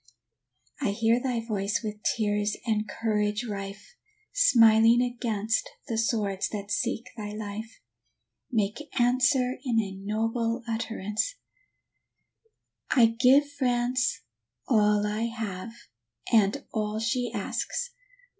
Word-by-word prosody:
I -, -, +1 dB
hear 230 Hz, +3 st, +2 dB
thy 245 Hz, -3 st, -1 dB
voice 210 Hz, 0 st, -1 dB
with 210 Hz, -1 st, -5 dB
tears 210 Hz, -1 st, 0 dB
and 215 Hz, -2 st, 0 dB
courage 210 Hz, +1 st, -1 dB
rife, 200 Hz, -, -7 dB, 0.4 s
Smiling 230 Hz, -, +6 dB
against 230 Hz, -3 st, -1 dB, 0.2 s
the 230 Hz, -, -2 dB
swords 210 Hz, -5 st, 0 dB
that 205 Hz, -1 st, -6 dB
seek 225 Hz, +3 st, -1 dB
thy 210 Hz, -2 st, -6 dB
life 215 Hz, +1 st, -6 dB, 0.7 s
Make 220 Hz, +6 st, -1 dB
answer 250 Hz, +1 st, +3 dB
in 240 Hz, -5 st, +1 dB
a 200 Hz, -3 st, -2 dB
noble 225 Hz, +4 st, -2 dB
utterance: 225 Hz, -, -2 dB, 1.5 s
"I 245 Hz, -4 st, +6 dB
give 270 Hz, +4 st, +6 dB
France 245 Hz, -2 st, 0 dB, 0.5 s
all 210 Hz, -2 st, +3 dB
I 210 Hz, +2 st, -1 dB
have, 220 Hz, -3 st, -4 dB, 0.6 s
and 220 Hz, +5 st, +3 dB
all 215 Hz, -1 st, -1 dB
she 245 Hz, +2 st, -1 dB
asks. 485 Hz, 0 st, -3 dB
225 Hz, 110 wpm, -27 LUFS, 210-245 Hz, 1.5 s, Smiling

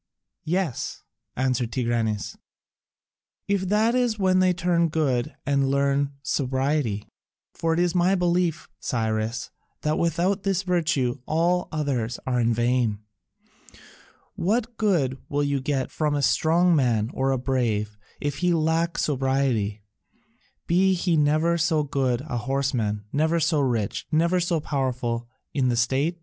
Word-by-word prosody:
"Yes," 175 Hz, -5 st, -2 dB, 0.3 s
answered 125 Hz, -2 st, 0 dB
Tigranes, 115 Hz, -4 st, -1 dB, 1.1 s
"if 195 Hz, -2 st, 0 dB
that 215 Hz, +3 st, +3 dB
is 245 Hz, -3 st, +1 dB
when 185 Hz, -2 st, +3 dB
they 185 Hz, 0 st, +4 dB
turn 175 Hz, -1 st, +1 dB
to -, -, -1 dB
good 150 Hz, -3 st, 0 dB
and 140 Hz, -1 st, +1 dB
learn 140 Hz, 0 st, +1 dB
sobriety. 130 Hz, -5 st, -1 dB, 0.5 s
For 165 Hz, 0 st, 0 dB
it -, -, 0 dB
is 175 Hz, -1 st, +2 dB
my 180 Hz, +2 st, +3 dB
belief, 175 Hz, -2 st, 0 dB
Cyrus, 110 Hz, 0 st, -2 dB, 0.3 s
that 150 Hz, +1 st, 0 dB
without 175 Hz, +4 st, +1 dB
this 195 Hz, -1 st, 0 dB
virtue 155 Hz, -8 st, 0 dB
all 175 Hz, +3 st, +1 dB
others 130 Hz, -7 st, -1 dB
are 125 Hz, -1 st, 0 dB
in 115 Hz, 0 st, +2 dB
vain. 120 Hz, -2 st, +1 dB, 1.4 s
What 225 Hz, +6 st, -1 dB
good 165 Hz, -, +1 dB
will 145 Hz, 0 st, 0 dB
you 140 Hz, -1 st, 0 dB
get 135 Hz, -2 st, -1 dB
from 150 Hz, -2 st, 0 dB
a 145 Hz, -, 0 dB
strong 170 Hz, +5 st, +3 dB
man 120 Hz, -5 st, +1 dB
or 135 Hz, +1 st, 0 dB
a 135 Hz, -, +2 dB
brave 115 Hz, -5 st, -1 dB, 0.2 s
if 145 Hz, -1 st, -2 dB
he 180 Hz, -1 st, +2 dB
lack 165 Hz, +1 st, +1 dB
sobriety, 130 Hz, -7 st, 0 dB, 0.8 s
be 190 Hz, +2 st, +3 dB
he 175 Hz, -1 st, +1 dB
never 155 Hz, +3 st, +2 dB
so 160 Hz, -1 st, +2 dB
good 130 Hz, -4 st, 0 dB
a 135 Hz, -4 st, -4 dB
horseman, 120 Hz, -5 st, -1 dB
never 160 Hz, +3 st, +2 dB
so 160 Hz, -1 st, +2 dB
rich, 120 Hz, -7 st, -1 dB
never 170 Hz, +3 st, +2 dB
so 175 Hz, -1 st, 0 dB
powerful 125 Hz, -5 st, -2 dB, 0.2 s
in 130 Hz, -3 st, +1 dB
the 120 Hz, -, 0 dB
state? 135 Hz, +8 st, +1 dB
145 Hz, 140 wpm, -25 LUFS, 125-170 Hz, 1.4 s, they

